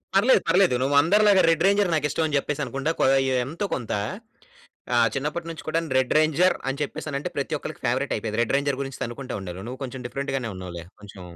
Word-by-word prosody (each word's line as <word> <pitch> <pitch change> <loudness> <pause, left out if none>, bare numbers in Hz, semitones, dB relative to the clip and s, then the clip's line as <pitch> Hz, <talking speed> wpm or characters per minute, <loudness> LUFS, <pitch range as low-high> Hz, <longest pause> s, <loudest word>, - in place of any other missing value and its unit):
పర్లేదు, 230 +7 +5
పర్లేదు. 185 -7 +4
నువ్వు 140 +2 +1
అందరిలాగా 205 +3 +5
రెడ్ 165 0 +2
రేంజర్ 200 -2 +3
నాకు 155 -2 +1
ఇష్టం 160 - -1
అని 145 - -2
చెప్పేసి 150 +1 -2
అనుకుం‌డ, 135 +3 -4
కొ - - +3 0.4
ఎంతో 165 +9 -4
కొంత. 120 -5 -6 1.0
ఆహ్, 115 -1 +5
చిన్నపట్నుంచి 160 +4 -4
కూడా‌ను 165 0 -1
రెడ్ 130 -1 +1
రేంజర్ 160 +4 +3
అని 135 - -4
చెప్పేసానంటే, 145 0 -4
ప్రతి - - -1
ఒక్కరికి - - -8
ఫేవ‌రెట్ - - 0
అయిపోయేది. 110 0 -3
రెడ్ 120 - -3
రేంజర్ 140 -1 -1
గురించి 135 -2 -8
తన్నుకుంటా 120 +1 -5
ఉండేవాళ్లు. 95 +1 -7
నువ్వు 130 +2 -8
కొంచెం 130 0 -6
డిఫరెంట్ 135 +3 -4
గానే 120 -4 -3
ఉన్నావులే. 90 -2 -7 0.2
కొంచెం 100 -2 -12
140 Hz, 190 wpm, -24 LUFS, 125-165 Hz, 1.0 s, పర్లేదు